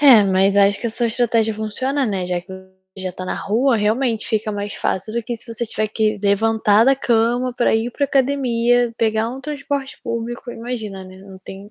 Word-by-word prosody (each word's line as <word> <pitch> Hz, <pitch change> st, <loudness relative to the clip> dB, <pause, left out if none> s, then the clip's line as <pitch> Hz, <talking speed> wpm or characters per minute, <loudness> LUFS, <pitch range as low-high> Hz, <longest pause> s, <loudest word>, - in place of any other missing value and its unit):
É, 260 Hz, -7 st, +8 dB
mas 195 Hz, +1 st, +2 dB
acho 200 Hz, 0 st, +4 dB
que -, -, -2 dB
a 230 Hz, -, -1 dB
sua 235 Hz, +1 st, 0 dB
estratégia 230 Hz, -1 st, +1 dB
funciona, 260 Hz, +6 st, -1 dB
né, 190 Hz, -4 st, -2 dB
já 180 Hz, -1 st, -1 dB
que 190 Hz, +2 st, -13 dB
o 190 Hz, 0 st, -14 dB, 0.2 s
já 185 Hz, -1 st, -4 dB
tá 185 Hz, -, -7 dB
na -, -, -3 dB
rua, 235 Hz, +4 st, +1 dB
realmente, 225 Hz, +2 st, 0 dB
fica 220 Hz, -1 st, -1 dB
mais 205 Hz, 0 st, -4 dB
fácil 215 Hz, +4 st, -2 dB
do 235 Hz, -, -1 dB
que 235 Hz, +1 st, -4 dB
se 225 Hz, -, -12 dB
você 230 Hz, +1 st, -2 dB
tiver 215 Hz, -1 st, -2 dB
que 215 Hz, 0 st, 0 dB
levantar 215 Hz, +1 st, +3 dB
da 270 Hz, -, +5 dB
cama 240 Hz, 0 st, +1 dB
para 240 Hz, -, +2 dB
ir 225 Hz, +2 st, 0 dB
para 285 Hz, -, 0 dB
academia, 245 Hz, -3 st, +2 dB
pegar 220 Hz, 0 st, +1 dB
um 265 Hz, +2 st, -7 dB
transporte 280 Hz, -1 st, -4 dB
público, 235 Hz, +2 st, -4 dB
imagina, 225 Hz, -5 st, -6 dB
né, 185 Hz, 0 st, -12 dB
não 190 Hz, 0 st, -13 dB
tem 195 Hz, +2 st, -11 dB
225 Hz, 210 wpm, -20 LUFS, 205-245 Hz, 0.2 s, É